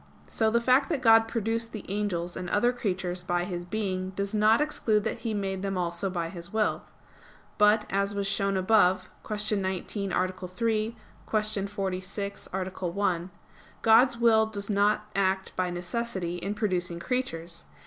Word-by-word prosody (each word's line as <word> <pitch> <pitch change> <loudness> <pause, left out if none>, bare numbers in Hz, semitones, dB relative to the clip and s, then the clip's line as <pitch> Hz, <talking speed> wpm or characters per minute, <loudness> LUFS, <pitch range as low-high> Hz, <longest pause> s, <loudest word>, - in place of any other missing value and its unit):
So 220 -1 +1
the 235 +2 +3
fact 255 +4 +3
that 295 -6 -1
God 225 -1 +7
produced 230 0 -2
the 215 - -6
angels 185 -4 -2
and 180 -1 -5
other 240 +6 +3
creatures 185 -6 -2
by 175 0 0
His 175 -1 -4
being 185 -2 -2
does 200 +2 -2
not 215 +2 +4
exclude 225 -8 +1
that - - -2
He 230 - -3
made 195 -2 -2
them 195 -1 -2
also 175 +2 -1
by 170 -2 -2
His 170 +1 -8
will. 215 -1 +1 0.8
But, 210 +1 +5
as 200 +1 0
was 200 0 -1
shown 195 0 0
above 185 -2 +3
(Q. 210 0 -1
19, 190 +1 -2
A. 185 +1 +2 0.2
3; 220 +4 -1 0.4
Q. 215 -2 0
46, 195 0 -4
A. 190 0 -1 0.2
1), 180 -1 -1 0.5
God's 235 +2 +6
will 225 -2 +4
does 205 -1 -4
not 205 +1 +2
act 190 -1 0
by 185 -1 0
necessity 180 0 -3
in 195 +4 -3
producing 180 -5 -1
creatures. 170 -7 -3
200 Hz, 160 wpm, -28 LUFS, 185-220 Hz, 0.8 s, God